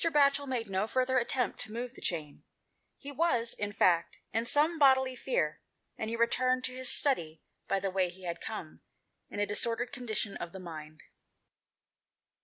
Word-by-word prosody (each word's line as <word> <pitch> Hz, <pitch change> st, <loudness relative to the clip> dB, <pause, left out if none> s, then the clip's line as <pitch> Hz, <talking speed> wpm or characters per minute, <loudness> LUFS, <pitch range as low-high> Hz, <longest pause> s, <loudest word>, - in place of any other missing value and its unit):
Batchel 285 Hz, -3 st, +3 dB
made 245 Hz, -4 st, -2 dB
no 195 Hz, +2 st, 0 dB
further 255 Hz, +2 st, +2 dB
attempt 250 Hz, +1 st, -1 dB
to 220 Hz, -, -5 dB
move 240 Hz, +2 st, -4 dB
the -, -, -14 dB
chain; 155 Hz, -4 st, -3 dB, 0.6 s
he 285 Hz, -, -8 dB
was, 255 Hz, -7 st, +1 dB
in 205 Hz, 0 st, -3 dB
fact, 170 Hz, -4 st, +2 dB, 0.2 s
in 225 Hz, +1 st, +1 dB
some 310 Hz, +6 st, +3 dB
bodily 265 Hz, -2 st, +5 dB
fear, -, -, -1 dB, 0.3 s
and 220 Hz, -, -3 dB
he 230 Hz, -, -2 dB
returned 255 Hz, +2 st, +2 dB
to 255 Hz, -, -3 dB
his 260 Hz, -1 st, +2 dB
study 165 Hz, -, +2 dB, 0.2 s
by 195 Hz, -, +1 dB
the 195 Hz, 0 st, -2 dB
way 185 Hz, -1 st, +1 dB
he 185 Hz, +2 st, -14 dB
had 170 Hz, -1 st, -4 dB
come, 195 Hz, -8 st, -6 dB, 0.5 s
in -, -, -6 dB
a 205 Hz, -, +3 dB
disordered 230 Hz, +4 st, -1 dB
condition 220 Hz, -5 st, -2 dB
of 175 Hz, +2 st, -6 dB
mind. 155 Hz, -3 st, -9 dB
230 Hz, 170 wpm, -31 LUFS, 190-260 Hz, 0.6 s, bodily